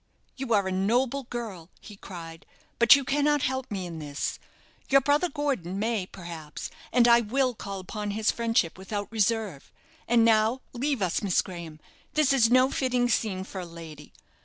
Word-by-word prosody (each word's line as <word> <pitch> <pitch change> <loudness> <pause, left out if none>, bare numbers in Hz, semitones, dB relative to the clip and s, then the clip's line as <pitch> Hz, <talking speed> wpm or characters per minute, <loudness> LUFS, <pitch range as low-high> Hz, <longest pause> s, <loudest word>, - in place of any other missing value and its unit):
"You 265 -2 -5
are 200 -2 +2
a - - -2
noble 240 +8 +1
girl," 215 -9 -6
he 210 - -12
cried; 165 -4 -10 0.3
"but 235 +3 +9
you 280 - 0
cannot 290 +1 +1
help 260 -2 -2
me 195 -3 -4
in 165 -2 -7
this. 145 -1 -4 0.5
Your 275 - +7
brother 290 +6 +2
Gordon 270 - -2
may, 215 -3 -1
perhaps, 170 -5 -8 0.2
and 240 -1 +5
I 235 0 +7
will 255 +3 0
call 200 -3 -6
upon 210 +3 -5
his 210 +1 +1
friendship 225 -7 0
without 205 +2 -5
reserve. 215 -7 -1 0.4
And 230 -1 +4
now 225 +3 +3
leave 260 -2 -1
us, 180 - 0
Miss 195 -4 +2
Graham; 170 -4 -9 0.4
this 305 -3 +4
is 235 -4 +4
no 255 +2 +5
fitting 250 -2 +1
scene 200 -5 0
for 190 0 -7
a - - -6
lady. 160 -3 -11
220 Hz, 175 wpm, -27 LUFS, 185-255 Hz, 0.5 s, but